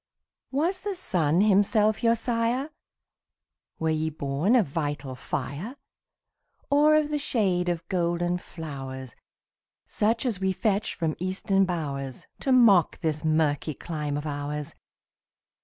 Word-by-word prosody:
Was 335 +8 0
the 405 0 -4
sun 175 - +1
himself 210 +1 +3
your 230 0 +4
sire? 235 +4 -1 1.1
Were 160 0 0
ye 155 0 0
born 150 - 0
of 230 -6 +4
vital 145 -3 -3
fire? 140 - -5 1.0
Or 300 +2 +5
of 305 -1 +2
the 295 - 0
shade 190 -11 +1
of 170 -1 -3
golden 175 0 0
flowers, 135 -7 -8 0.7
Such 225 +5 0
as 225 -7 -1
we 190 0 +1
fetch 205 +1 0
from 160 -2 -1
Eastern 190 +2 +1
bowers, 140 -7 -4
To 270 - -1
mock 225 -9 +5
this 155 -2 -1
murky 155 -1 +1
clime 150 -2 -4
of 145 - -5
ours? 145 0 -4
175 Hz, 125 wpm, -26 LUFS, 150-225 Hz, 1.1 s, Or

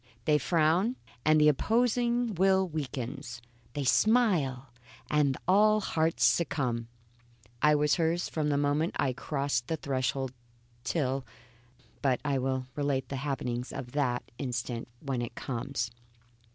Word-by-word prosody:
They 150 -1 +4
frown, 170 - +2 0.3
and 155 0 +5
the 150 - +6
opposing 235 - +2
will 190 +1 +3
weakens; 135 -4 -5 0.3
they 145 - -2
smile, 145 - +2 0.4
and 145 -3 +2
all 215 +3 +5
hearts 165 -5 0
succumb. 125 -8 +1 0.7
I 150 +1 +5
was 150 +2 +2
hers 170 +1 +1
from 155 -2 -1
the 145 - +2
moment 145 +3 +1
I 130 -2 +1
crossed 140 -3 -2
the 160 - -1
threshold 130 -2 -2 0.5
till 135 -1 -1 0.8
But 130 -3 +2
I 140 -2 +1
will 130 0 -1
relate 140 -3 -1
the 140 - -3
happenings 125 -3 -3
of 130 -3 -6
that 125 -4 -1
instant 120 -3 -3
when 135 -4 -2
it 120 - -5
comes. 125 -1 -3
145 Hz, 130 wpm, -29 LUFS, 130-160 Hz, 0.8 s, the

